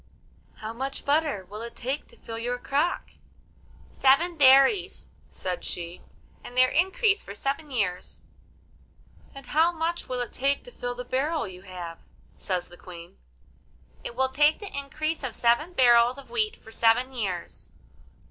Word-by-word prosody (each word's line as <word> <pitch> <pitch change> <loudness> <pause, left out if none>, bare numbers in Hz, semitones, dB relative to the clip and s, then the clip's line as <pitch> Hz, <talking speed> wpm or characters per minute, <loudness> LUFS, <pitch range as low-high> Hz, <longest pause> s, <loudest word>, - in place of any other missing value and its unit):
'How 220 0 -6
much 270 +3 -5
butter 285 -9 +1
will 210 +2 -8
it 235 0 -7
take 265 +4 -3
to - - -17
fill 225 0 -7
your 245 +2 -2
crock?' 285 +7 -1 0.8
'Seven 300 +6 +3
dairies,' 275 +6 +5 0.2
said 180 -1 -4
she, 170 0 -5 0.4
'and 245 - -10
their 255 0 +6
increase 400 +5 +2
for 200 - -9
seven 280 +6 -3
years.' 200 -9 -2 1.2
'And 275 -1 -9
how 320 +6 +3
much 335 +1 -3
will 250 -1 -1
it 245 - -4
take 280 +2 0
to - - -11
fill 245 - -4
the 250 0 -6
barrel 290 +4 0
you 185 -1 -10
have?' 180 -3 -8 0.4
says 180 -3 -2
the 175 - -14
Queen. 170 -2 -11 0.9
'It 235 - -6
will 265 +1 +2
take 295 +3 +4
the 410 -7 -8
increase 310 +3 -2
of 260 - -3
seven 240 +9 +2
barrels 240 -2 +5
of 275 - -12
wheat 440 -1 0
for 225 - -15
seven 235 +4 +3
years. 195 -8 -4
260 Hz, 155 wpm, -27 LUFS, 225-305 Hz, 1.2 s, their